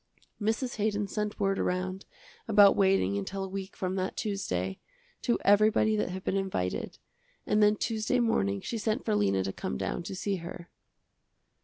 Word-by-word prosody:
Mrs. 225 +4 -1
Haydon 210 -1 0
sent 210 +1 -3
word 195 -1 +1
around, 185 +1 -2 0.4
about 205 -2 +7
waiting 190 - +3
until 195 - -4
a - - -3
week 190 0 -6
from 185 0 -2
that 185 +1 -2
Tuesday, 95 - -2 0.4
to 240 - +1
everybody 215 +1 +4
that 210 - 0
had 190 +1 -6
been - - -1
invited, 190 - -2 0.5
and 210 - +2
then 210 0 +5
Tuesday 225 +3 0
morning 100 - +1
she 230 - -4
sent 215 0 -1
for - - +1
Lena 100 -2 +2
to 95 0 -3
come 65 - -4
down - - -2
to 180 +3 -6
see 195 +1 -1
her. 170 0 -9
195 Hz, 170 wpm, -29 LUFS, 180-210 Hz, 0.5 s, about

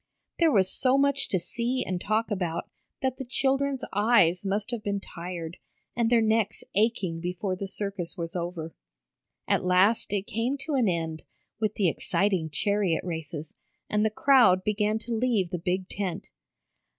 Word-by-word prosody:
There 330 -2 +5
was 190 -6 +3
so 260 +1 +3
much 280 0 +2
to 190 - +2
see 240 +8 -2
and 180 -1 -3
talk 220 +2 0
about 175 -4 -2 0.4
that 260 -1 0
the - - -4
children's 270 +1 0
eyes 205 -4 +4
must 205 +3 -1
have 235 -3 -3
been 200 -1 -2
tired, 170 -3 -7 0.4
and 235 -1 +2
their 230 -1 +4
necks 220 -1 +1
aching 200 -5 +1
before 180 +2 -2
the 195 +1 -5
circus 195 -2 -4
was 165 0 -5
over. 170 -2 -4 0.7
At - - +2
last 185 +5 +3
it 200 -1 -1
came 235 +7 -1
to 310 - -4
an 255 -5 +3
end 165 -2 -2 0.4
with 215 -1 0
the 195 - +2
exciting 185 0 0
chariot 200 +1 0
races, 160 -3 -5 0.4
and 210 0 +2
the 220 - +3
crowd 215 -6 +5
began 210 0 +1
to 230 +1 -5
leave 220 -6 +1
the 180 - -2
big 185 +2 -1
tent. 190 -4 -4
200 Hz, 165 wpm, -27 LUFS, 180-230 Hz, 0.7 s, There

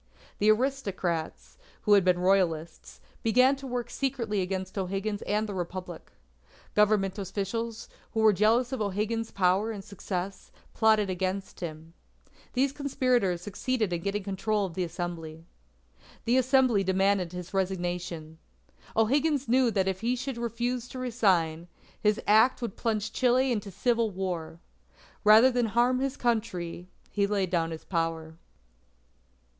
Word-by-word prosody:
The 210 - +4
aristocrats, 210 - -1 0.2
who 210 - +4
had 200 -2 +6
been 180 -1 +3
Royalists, 175 -4 0 0.2
began 255 +4 +4
to 275 0 -8
work 245 -1 -3
secretly 235 -7 -1
against 185 0 -4
O'Higgins 195 +2 -2
and 210 +1 +1
the 205 - -5
Republic. 180 0 -6 0.6
Government 210 -2 +2
officials, 210 +4 -4 0.3
who 220 - +1
were 215 -1 +6
jealous 225 +6 +3
of 265 - -3
O'Higgins's 215 +3 -1
power 190 +3 +2
and 205 -3 -5
success, 190 -1 -5 0.2
plotted 215 -3 +3
against 190 +1 -3
him. 160 -1 -7 0.6
These 265 +2 +2
conspirators 255 - 0
succeeded 215 0 -1
in 170 - -2
getting 200 +2 -2
control 200 +1 -1
of 180 - -7
the 185 - -1
Assembly. 165 -2 -6 0.8
The 240 +2 +3
Assembly 255 -5 +3
demanded 190 -1 +1
his 180 0 -8
resignation. 175 -4 -3 0.6
O'Higgins 280 +5 +2
knew 250 +1 +4
that 195 -4 0
if 190 -1 -2
he 240 +2 +1
should 255 -1 -4
refuse 240 +1 -2
to 260 - -9
resign, 185 -10 +1 0.3
his 210 0 +2
act 220 +5 +5
would 235 -5 -4
plunge 220 -1 -2
Chile 255 +1 +3
into 210 -3 -2
civil 230 +4 +1
war. 180 -4 -4 0.6
Rather 220 +5 +7
than 245 -2 +1
harm 240 +3 +2
his 270 +1 -2
Country, 210 -8 -2 0.2
he 200 -1 +1
laid 200 -3 0
down 165 -2 +1
his 160 -1 -7
power. 165 -2 -2
205 Hz, 140 wpm, -28 LUFS, 180-235 Hz, 0.8 s, Rather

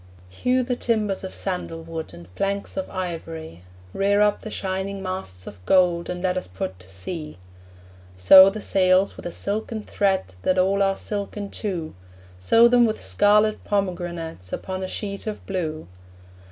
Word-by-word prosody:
Hew 250 - +1
the 250 0 -1
timbers 215 -6 -1
of 190 - -6
sandal 180 -3 -4
wood, 160 -7 -6
And 85 +1 -13
planks 200 - -2
of 285 -1 -3
ivory; 165 - -6 0.3
Rear 200 +1 +2
up 210 0 +3
the 215 - -7
shining 190 0 -3
masts 140 - -5
of 95 -3 -11
gold, 175 -2 +3
And 180 0 -4
let 185 -1 +1
us 185 - -3
put 95 0 -5
to 90 0 -11
sea. 150 - -6 0.8
Sew 190 - +9
the 210 +2 -6
sails 185 0 +3
with - - -7
a - - -5
silken 215 +3 -3
thread 190 - 0
That 185 - +1
all 195 +2 +2
are 195 0 +2
silken 205 -1 -4
too; 175 -7 -4 0.5
Sew 230 - +6
them 240 -1 +5
with 215 - -2
scarlet 210 - +3
pomegranates 175 - -3
Upon 190 0 -4
a 185 - -3
sheet 200 +1 -5
of 215 - -5
blue. 160 -5 -3
185 Hz, 165 wpm, -24 LUFS, 165-205 Hz, 0.8 s, Sew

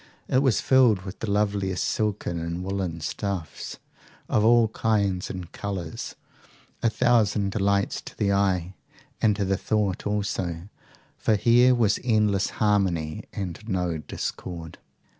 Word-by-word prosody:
It 130 - +3
was 130 -7 +2
filled 125 -8 +4
with 95 0 -8
the 115 - -3
loveliest 100 -2 0
silken 105 -5 -1
and 85 +2 -4
woollen 95 -4 -3
stuffs, 95 -2 -4 0.5
of 105 - +2
all 115 0 +5
kinds 100 -5 0
and 90 -3 -6
colours, 95 -5 -5 0.7
a 115 - +3
thousand 110 -3 +2
delights 100 -1 +1
to - - -10
the 100 -1 +1
eye 95 -2 +1 0.5
and 105 -2 +4
to 100 -1 -1
the 95 0 +1
thought 105 -2 -1
also, 95 -4 -2 0.5
for 110 - +2
here 120 +4 +5
was 110 -4 +2
endless 105 -4 +2
harmony, 95 -7 +1
and 90 -4 -5
no 90 -4 -1
discord. 80 +1 -6
100 Hz, 135 wpm, -25 LUFS, 90-105 Hz, 0.7 s, all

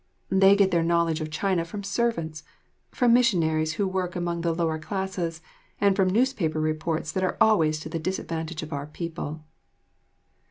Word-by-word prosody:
They 195 +1 +6
get 200 -2 +3
their 170 - +3
knowledge 165 -1 +1
of 155 - -3
China 175 +2 0
from 200 +5 -7
servants, 195 -7 -1 0.5
from 245 -3 +3
missionaries 160 -10 +2
who 195 +4 0
work 185 -1 -2
among 175 -1 -2
the 170 0 +1
lower 165 -1 -1
classes, 175 -2 -4 0.4
and 200 -1 +3
from 190 -2 +3
newspaper 195 -8 +1
reports 155 0 -1
that 185 +3 -1
are 185 - -1
always 160 -8 +4
to - - -6
the 165 - -3
disadvantage 165 -2 -4
of 155 0 -7
our 140 0 -4
people. 155 -1 -6
170 Hz, 165 wpm, -26 LUFS, 160-190 Hz, 0.5 s, They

